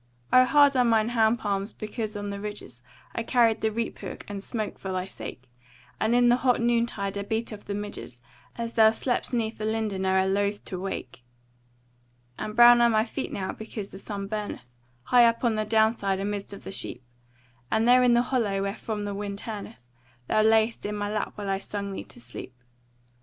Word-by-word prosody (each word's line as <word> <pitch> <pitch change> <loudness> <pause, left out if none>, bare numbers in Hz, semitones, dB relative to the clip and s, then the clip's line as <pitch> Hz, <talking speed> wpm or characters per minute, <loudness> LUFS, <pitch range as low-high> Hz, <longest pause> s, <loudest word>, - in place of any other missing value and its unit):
O 255 0 +8
hard 285 0 +5
are 250 - +4
mine 225 -2 +3
hand 225 -1 +3
palms 200 -1 -2
because 215 0 -4
on 205 0 -4
the 200 - -5
ridges 205 - -7 0.3
I - - -2
carried 230 -1 +3
the 220 - +1
reap 230 +1 -3
hook - - -7
and 205 -1 -5
smote 215 +1 -4
for 190 - -5
thy 185 0 -2
sake; 130 -8 -9 0.6
And 230 +2 +2
in 245 0 +5
the 240 +1 +5
hot 250 -1 +2
noon 235 0 +2
tide 200 -3 -3
I - - -2
beat 220 +3 -2
off 205 - -10
the 200 - -3
midges 205 -12 -7 0.3
As 230 0 -4
thou 220 -1 +7
slep'st 245 +3 -1
'neath 230 -3 -1
the 215 - -2
linden 215 -3 -1
o'er 190 0 +3
loathe 200 +1 0
to 185 - -5
awake. 180 -10 -5 1.2
And 215 - -4
brown 240 0 +8
are 235 - +6
my 220 -1 +3
feet 225 - -5
now 190 -1 -3
because 220 -2 -7
the 190 - -9
sun 200 -1 -5
burneth 205 - -6 0.3
High 245 - +6
up 230 +1 0
on 235 -2 +3
the 215 0 -1
down 220 +1 +4
side 195 -4 -1
amidst 200 0 -3
of 200 - -10
the - - -7
sheep, 160 - -3 0.7
And 220 +1 +2
there 250 +1 +7
in 250 -1 +5
the 240 0 +4
hollow 215 -7 0
wherefrom 210 +1 -3
the 205 - -3
wind 200 0 -4
turneth, 210 - -8 0.4
Thou 215 - +3
lay'st 220 +1 +3
in 210 0 -3
my 205 0 -2
lap 215 -1 -2
while 205 -1 -5
I 195 0 0
sung 200 0 -5
thee - - -6
to - - -14
sleep. 120 +1 -10
215 Hz, 210 wpm, -27 LUFS, 200-230 Hz, 1.2 s, O